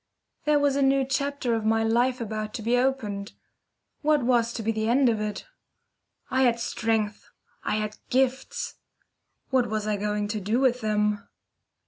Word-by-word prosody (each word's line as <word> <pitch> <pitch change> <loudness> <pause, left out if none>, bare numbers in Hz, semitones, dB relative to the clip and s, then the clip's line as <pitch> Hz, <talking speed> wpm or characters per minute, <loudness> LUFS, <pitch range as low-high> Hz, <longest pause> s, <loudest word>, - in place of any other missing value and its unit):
Here 300 0 +4
was 285 -1 +2
a 280 - +1
new 270 0 +3
chapter 280 -2 -1
of 225 -1 0
my 225 +1 +2
life 240 +3 +2
about 215 -2 -4
to 220 - -5
be 235 +3 +2
opened. 235 -6 -1 0.7
What 300 -2 +3
was 235 -1 +2
to 225 - -4
be 225 - +1
the 220 0 -1
end 260 +1 +4
of 220 -2 0
it? 210 -1 -4 0.9
I 260 0 +2
had 240 -2 +3
strength, 225 -3 -1 0.3
I - - 0
had 215 0 -3
gifts. 260 0 0 0.7
What 255 -2 +3
was 215 -1 -2
I 210 -1 0
going 210 0 -1
to 215 0 -2
do 215 +6 +1
with 255 -2 +2
them? 210 -1 +1
230 Hz, 170 wpm, -26 LUFS, 215-260 Hz, 0.9 s, Here